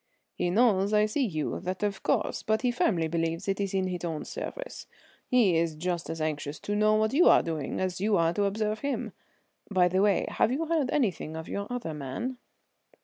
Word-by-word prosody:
"He 175 - -1
knows 205 -1 +3
I 210 0 +5
see 215 +7 0
you, 155 -6 -2
that 185 +3 -4
of 205 -1 -1
course, - - 0
but 220 +1 0
he 250 - +3
firmly 180 -9 +1
believes 165 +2 -2
it 195 0 0
is 200 -1 -1
in 190 -1 +1
his 180 -2 -4
own 160 -3 -3
service. - - -6 0.4
He 225 -9 +4
is 165 -1 +1
just 170 +1 -3
as 165 - -4
anxious 150 -1 -2
to 205 - -2
know 215 +1 +4
what 215 +2 +1
you 340 +6 +5
are - - +6
doing 160 -4 -3
as 185 -1 -2
you 210 0 +3
are 165 0 +2
to 200 +3 +1
observe 215 +2 -1
him. 280 +2 -2 0.6
By 185 -3 +4
the 185 +2 +2
way, 200 -1 +3
have 225 - +1
you 300 +6 -1
heard 315 -5 +1
anything 195 - -1
of 160 +1 -6
your 200 0 -4
other 245 -10 -4
man?" 150 - -5
195 Hz, 210 wpm, -28 LUFS, 165-220 Hz, 0.6 s, are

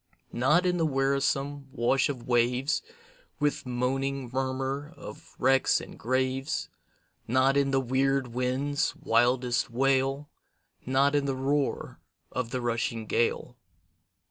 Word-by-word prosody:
Not 150 +9 +3
in 180 -1 +2
the 165 - +1
wearisome 140 0 0
wash 130 +3 +1
of 125 -4 -5
waves, 125 +4 +2 0.6
With 145 -3 -1
moaning 130 +1 -2
murmur 135 +3 -2
of 155 +3 -11
wrecks 135 +1 +3
and - - -10
graves, 130 +3 -1 0.6
Not 130 +3 +3
in 140 -1 +2
the 135 0 +2
weird 135 +1 +1
winds' 130 +3 0
wildest 120 +2 +1
wail, 135 +3 +1 0.6
Not 135 +2 +3
in 145 -1 +2
the 135 -1 -1
roar 140 +2 -1 0.3
of 125 -2 -3
the 130 0 -3
rushing 115 -1 -2
gale. 120 +2 0
135 Hz, 120 wpm, -28 LUFS, 125-140 Hz, 0.6 s, Not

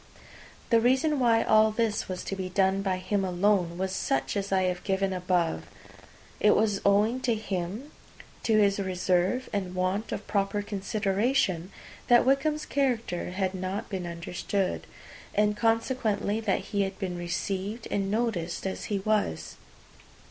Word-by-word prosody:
The 230 -1 +5
reason 265 +5 +2
why 230 -2 +4
all 215 0 +5
this 215 -2 -1
was 185 -1 -4
to 195 - -4
be 190 -1 -4
done 190 0 +2
by 190 -2 0
him 195 +2 -1
alone, 180 -1 +1
was 190 +1 -2
such 135 -5 -1
as 200 -1 -2
I 190 -1 +3
have 180 -1 -1
given 195 -1 0
above. 180 -2 0 0.7
It 210 - +5
was 210 -2 +1
owing 210 +5 +3
to 245 -3 +1
him, 210 - -4 0.5
to 220 -2 +2
his 200 -1 +3
reserve 185 +5 0
and 185 -3 -2
want 185 +4 -1
of 205 - -4
proper 200 0 0
consideration, 200 -1 0 0.4
that 240 -1 +6
Wickham's 300 +3 +1
character 240 -11 -1
had 185 +1 -1
been 185 -1 -6
so 185 +1 -2
misunderstood, 180 +1 -3 0.5
and 210 0 +3
consequently 225 -2 0
that 215 -4 0
he 200 - +2
had 195 0 -2
been 185 -3 -3
received 190 +5 -3
and 195 -1 0
noticed 205 -7 -1
as 190 - -3
he 205 - -1
was. 195 - -1
200 Hz, 150 wpm, -28 LUFS, 185-220 Hz, 0.7 s, that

